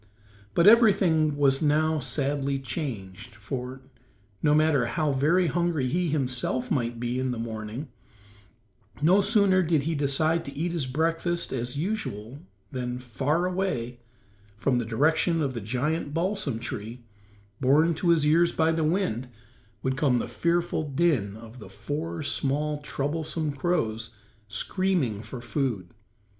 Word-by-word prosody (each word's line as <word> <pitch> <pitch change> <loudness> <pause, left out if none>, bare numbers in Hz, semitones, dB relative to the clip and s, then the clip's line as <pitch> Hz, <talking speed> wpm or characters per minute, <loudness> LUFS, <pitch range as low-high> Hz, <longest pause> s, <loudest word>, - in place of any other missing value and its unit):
But 170 - +4
everything 190 -9 +5
was 135 -2 +3
now 155 +1 +2
sadly 140 +1 -1
changed 115 - -6
for, 125 +4 -6 0.6
no 150 0 +4
matter 150 -6 +3
how 150 +4 0
very 155 +7 +3
hungry 170 -4 0
he 175 +4 0
himself 150 - -1
might 120 -6 -1
be 120 +1 -2
in 130 0 -1
the 125 - -2
morning, 115 +4 -5 1.1
no 180 +7 +5
sooner 200 -2 +4
did 160 -4 +1
he 165 +3 -1
decide 155 +3 +1
to 140 - -8
eat 170 +3 -1
his 165 -6 -2
breakfast 165 +5 -1
as 125 +1 -3
usual 145 - -4 0.3
than 125 -1 -3
far 135 +7 -1
away, 180 -11 -2 0.6
from 125 +3 +1
the 120 - -2
direction 160 +8 +2
of 140 -4 -1
the 115 - -5
giant 145 +8 -2
balsam 175 - -1
tree, 115 +1 -6 0.6
borne 150 +6 +4
to 170 +2 -1
his 165 -3 +4
ears 170 +3 +4
by 160 0 +2
the 160 0 0
wind, 155 - 0 0.6
would 130 0 -1
come 130 -4 +3
the - - -2
fearful 170 -1 0
din 135 - +1
of 115 +2 -12
the 100 - -11
four 145 - -4
small, 145 +1 0
troublesome 150 +2 -2
crows 115 -7 -1 0.4
screaming 145 - 0
for 115 +3 -8
food. 120 - -2
145 Hz, 140 wpm, -26 LUFS, 125-165 Hz, 1.1 s, everything